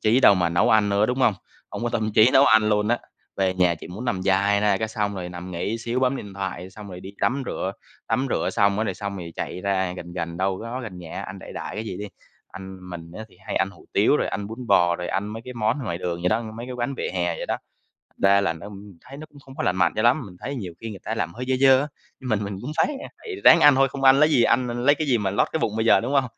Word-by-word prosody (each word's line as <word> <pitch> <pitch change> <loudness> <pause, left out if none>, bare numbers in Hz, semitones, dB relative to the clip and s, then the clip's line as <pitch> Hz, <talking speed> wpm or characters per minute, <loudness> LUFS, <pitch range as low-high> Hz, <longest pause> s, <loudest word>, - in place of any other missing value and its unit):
trí 115 +5 +3
đâu 100 - +7
mà 90 -2 +1
nấu 85 - +2
ăn 105 -2 +4
nữa, 100 +2 +2
đúng 125 +1 -1
hông? 115 -6 +3 0.4
Hông - - -6
có 120 - 0
tâm 110 -2 -1
trí 110 +3 +6
nấu 135 - +7
ăn 110 -1 +5
luôn 105 0 +1
á, 120 - +2 0.4
về 95 -1 +1
nhà 90 -2 +3
chỉ 80 - -11
muốn 105 +8 -7
nằm 95 -7 -1
dài 100 +1 +2
ra 105 -2 +3
cái 110 +2 -2
xong 105 -2 -2
rồi 90 -2 -5
nằm 90 +1 -8
nghỉ 100 +6 -3
xíu 120 +2 -2
bấm 130 +1 +2
điện 100 -6 -8
thoại, 95 -1 -5
xong 105 +1 -11
rồi 90 -1 -8
đi 95 +2 -9
tắm 135 +3 +1
rửa, - - -3 0.4
tắm 135 +2 +1
rửa - - 0
xong 100 0 +2
á, 110 - +1
rồi - - -2
xong 100 -1 -5
rồi 85 -3 -7
chạy 90 - -4
ra 95 -2 0
gần 85 0 -8
gần, 85 -1 -4
đâu 95 +3 -1
đó 120 +3 -5
gần 95 -6 -8
nhà 85 -2 -7
ăn - - -8
đại - - -10
đại - - -6
cái 110 +1 -4
gì 95 -4 -5
đi. 105 - -5 0.4
Ăn 95 -1 -10
mình 85 -1 -8
á 110 - -6
thì 95 - -22
hay - - -3
ăn 95 0 +1
hủ - - -18
tiếu, - - +4
rồi - - -1
ăn 100 0 -3
bún 115 +3 -8
bò, 85 -4 +4
rồi 90 - -5
ăn 100 +2 -1
mấy 110 +2 -7
cái 125 -1 -8
món 110 +3 0
ngoài 85 -5 -3
đường 85 -1 -3
vậy 90 - +2
đó, 110 +4 +1
mấy 115 +2 -7
cái 130 - -6
quán 125 +3 -2
vỉa - - -3
hè 90 -2 0
vậy - - -5
đó. - - -1 0.7
Ra 100 0 +5
là 95 -4 0
nó 80 +5 -10 0.3
thấy 135 - -12
nó 155 - -8
cũng 145 - -16
không 135 -1 -14
có - - -3
lành 90 - +1
mạnh 90 -2 +2
cho 110 - 0
lắm, 125 +4 +3
mình 90 -3 -12
thấy 140 - -5
nhiều 95 -9 -6
khi 115 - -5
người 100 -4 -8
ta - - -3
làm 85 - -2
hơi 125 +2 -6
dơ 130 - +3
dơ 135 -1 +6
á, 150 - -3 0.3
mình 110 -5 -1
mình 100 -1 -5
cũng 140 +5 -5
phái, 160 - +4 0.2
a - - -10
phải 430 -5 -7
ráng 165 - +9
ăn 145 -3 +8
thôi, 135 0 +3
không 135 0 -6
ăn 135 +1 +7
lấy 150 +1 +5
gì 120 -6 +4
ăn 125 +1 +2
l 120 +1 -3
lấy 145 +1 +6
cái 155 0 -3
gì 125 - +3
mà 100 -3 -1
lót 100 - +2
cái 160 - -1
bụng 105 - 0
bây 110 - 0
giờ, - - +6
đúng 130 +5 -3
hông? 135 -1 +4
105 Hz, 305 wpm, -24 LUFS, 95-120 Hz, 0.7 s, ráng